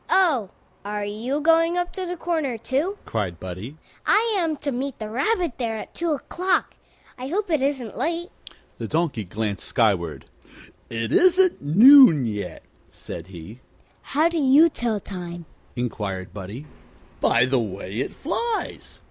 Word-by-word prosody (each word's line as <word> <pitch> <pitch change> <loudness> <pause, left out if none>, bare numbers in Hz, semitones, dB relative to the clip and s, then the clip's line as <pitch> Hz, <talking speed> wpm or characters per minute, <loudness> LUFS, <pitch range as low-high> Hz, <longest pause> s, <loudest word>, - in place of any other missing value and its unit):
"Oh, 295 - +3 0.3
are 205 0 -3
you 235 +8 -3
going 330 +2 +3
up 350 0 -2
to 370 -1 -4
the 355 0 -4
Corner, 320 -8 -1
too?" 285 - -1
cried 95 -7 -3
Buddie. 95 - -7 0.3
"I 450 +1 +3
am 330 -5 0
to 285 0 -3
meet 265 +2 -3
the 215 -1 -6
Rabbit 325 - 0
there 225 -3 -2
at - - -8
two 335 -2 -1
o'clock. 360 +6 -1 0.5
I 255 - -5
hope 375 +4 -2
it 310 -4 +2
isn't 265 -5 -2
late." 340 +2 -2 0.5
The - - -4
Donkey 160 -9 -1
glanced 105 +1 -4
skyward. 95 -9 0 0.6
"It 115 -1 -3
isn't 370 0 +4
noon 195 - +8
yet," 105 -3 -5 0.3
said 85 0 -8
he. 95 +5 -11 0.4
"How 305 +4 +2
do 335 -1 -1
you 290 +4 +6
tell 235 -7 -2
time?" 175 -3 -7 0.3
inquired 105 -6 -4
Buddie. 105 +8 -7 0.5
"By 115 +1 +4
the 130 0 +1
way 100 -2 -5
it 135 - -2
flies. 450 +9 -3
235 Hz, 150 wpm, -24 LUFS, -, 0.6 s, noon